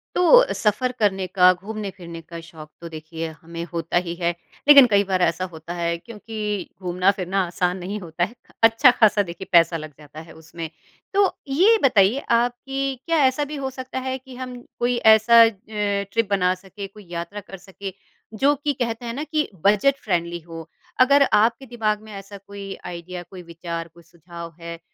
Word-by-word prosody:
तो - - +6
सफ़र 225 +4 0
करने 195 -3 +1
का, 185 0 +5
घूमने 205 +3 -6
फिरने 170 -2 -9
का 170 +1 -10
शौक 160 -2 -12
तो 170 - -7
देखिए 160 +1 -6
हमें 170 +1 -7
होता 170 0 -1
ही 170 - -3
है 170 0 0 0.4
लेकिन 285 -2 +10
कई 200 0 +4
बार 185 -1 +1
ऐसा 175 +1 +1
होता 160 +1 -8
है 170 -1 -1
क्योंकि 210 -1 -5
घूमना 180 +1 +2
फिरना 190 +1 0
आसान 180 +1 -1
नहीं 190 +3 -5
होता 175 -2 -3
है। 205 +7 -3 0.3
अच्छा 230 +4 +6
ख़ासा 215 -3 +4
देखिए 175 +1 -9
पैसा 170 -1 +5
लग 155 -1 -8
जाता 150 +1 -11
है 160 - -14
उसमें। 160 0 -8 0.4
तो 400 +1 +4 0.2
ये 370 +12 +4
बताइए 225 -1 +4 0.2
आप 240 +1 0
कि 270 -1 -2
क्या 330 -1 +1
ऐसा 260 +3 +1
भी 300 +1 -7
हो 265 - -1
सकता 260 0 -6
है 260 - -2
कि 260 0 -14
हम 250 -1 -7 0.2
कोई 240 0 +1 0.2
ऐसा 230 +2 +6
अ, 225 - +5 0.2
ट्रिप 205 +1 -1
बना 185 -2 +2
सके, 195 +2 -9
कोई 205 +1 -16
यात्रा 170 +4 -5
कर 195 -1 -11
सके 195 +1 -9 0.4
जो 275 +7 +3
कि 290 +1 -2
कहते 240 -2 -3
हैं 230 - -4
ना 280 +5 -4
कि 310 0 -1 0.2
बजट 210 +7 +4
फ़्रेंडली 175 -3 -1
हो। 165 0 -10 0.3
अगर 280 +1 +6
आपके 230 +5 +3
दिमाग 220 -4 -1
में 220 - -12
ऐसा 195 0 -9
कोई 200 0 -9
आईडिया, 175 +1 -7
कोई 185 +1 -11
विचार, 170 0 -6
कोई 170 +1 -19
सुझाव 170 0 -11
है, 170 0 -7
195 Hz, 190 wpm, -22 LUFS, 170-235 Hz, 0.4 s, लेकिन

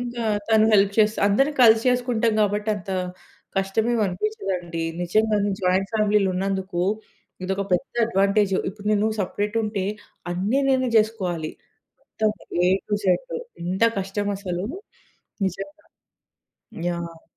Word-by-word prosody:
ఇంకా 240 -1 -4 0.2
తను 220 -1 +5
హెల్ప్ 200 0 +4
చేస్తే 215 0 +4
అందరం 270 +9 +3
కలిసి 225 -1 +7
చేసుకుంటాం 245 -2 +1
కాబట్టి 210 +1 0
అంత 195 -1 -8 0.7
కష్టమేమి 220 +5 +1
అనిపించదండి. 180 - -3 0.2
నిజంగానే 205 +3 +2
జాయింట్ 185 +2 +1
ఫ్యామిలీలో 210 -2 +3
ఉన్నందుకు 190 -1 -1 0.6
ఇదొక 190 +1 -1
పెద్ద 240 +9 0
అడ్వాంటేజ్. 200 -1 +2 0.2
ఇప్పుడు 205 +1 -12
నేను 210 +1 +2
సెపరేట్ 205 +3 -2
ఉంటే 210 -3 -2 0.5
అన్ని 205 +10 +1
నేనే 260 -2 +2
చేసుకోవాలి. 185 -8 -1 0.5
మొత్తం 215 -1 -1 0.4
ఏ - - +4 0.2
టు 205 - +1
జడ్ - - +1 0.3
ఎంత 190 +5 +1
కష్టం 195 +2 -2
అసలు 185 -1 -3 0.8
నిజంగా. 295 - -6 1.0
యాహ్! 170 -1 -6
205 Hz, 120 wpm, -24 LUFS, 190-220 Hz, 1.0 s, కలిసి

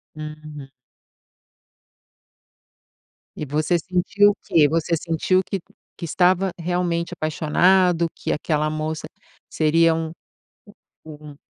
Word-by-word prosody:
Uhum. 155 -2 -9 2.7
E 150 - -4
você 155 +5 0
sentiu 185 +4 +2
o - - -7
quê? 155 -3 +4
Você 165 +2 0
sentiu 170 +3 +1
que 195 - -3 0.4
que - - -4
estava 185 +3 +2
realmente 170 0 -1
apaixonado? 170 +3 +2
Que - - -4
aquela 155 0 0
moça 155 0 -4 0.4
seria 165 +1 +3
um 160 -1 -3 0.9
u 155 -1 -10
um 145 - -12
165 Hz, 105 wpm, -22 LUFS, 155-180 Hz, 2.7 s, quê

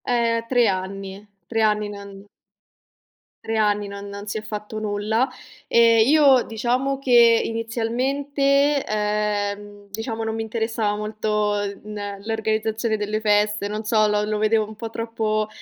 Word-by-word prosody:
Ehm. 230 -1 +1
3 245 -1 +3
anni. 195 +1 -4 0.2
3 225 -1 -1
anni 210 -1 +1
non 200 -1 -10 1.2
3 225 - -2
anni 210 -1 +1
non 200 0 -8
non 200 +1 -8
si 205 - -3
è - - -4
fatto 210 0 -6
nulla, 215 +3 0 0.4
e 230 -1 +5
io, 275 -2 +5
diciamo 250 +5 -1
che, 235 -3 +5
inizialmente, 275 +5 0
ehm, 205 -1 -2
diciamo, 225 +2 -4
non 220 0 -2
mi 225 - -2
interessava 220 -1 -1
molto 210 0 -1 0.3
n 205 -1 -6
l'organizzazione 220 0 -1
delle 210 +1 -2
feste, 210 -1 +1
non 210 +1 -4
so, 215 0 +3
lo 210 0 +1
lo 215 0 -1
vedevo 215 0 +2
un 220 - -10
po' 225 +1 -7
troppo 220 -2 -1
215 Hz, 140 wpm, -22 LUFS, 210-230 Hz, 1.2 s, e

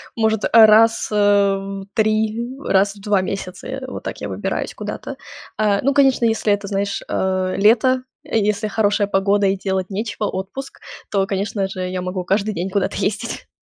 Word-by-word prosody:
может, 220 -2 +1
э, - - 0 0.2
раз, 225 +1 +4
э, - - -1 0.4
в 195 0 -6
3 220 +1 +1 0.2
раз 200 +1 +2
в 200 - -15
2 205 -2 +2
месяца, 185 -1 -5
э, 265 0 -5
вот - - -7
так - - -6
я - - -4
выбираюсь - - -3
куда-то. - - -6 0.4
Э, 205 -2 +2
ну, 275 +2 +2
конечно, 270 -3 +4
если 220 -2 +2
это, 205 0 -3
знаешь, 200 0 -2
э, 185 -1 0
лето, 240 +5 +4 0.2
если 210 0 0
хорошая 205 -1 +1
погода 200 +1 +2
и 195 - +2
делать 190 -1 -2
нечего, 210 +1 -3
отпуск, 200 +10 -6 0.3
то, 195 -2 +2
конечно 200 0 -1
же, 185 -1 -4
я 185 0 -3
могу 180 0 -3
каждый 200 +3 0
день 180 +3 -2
куда-то 190 0 -1
ездить. 215 +3 -3
205 Hz, 175 wpm, -20 LUFS, 195-220 Hz, 0.4 s, раз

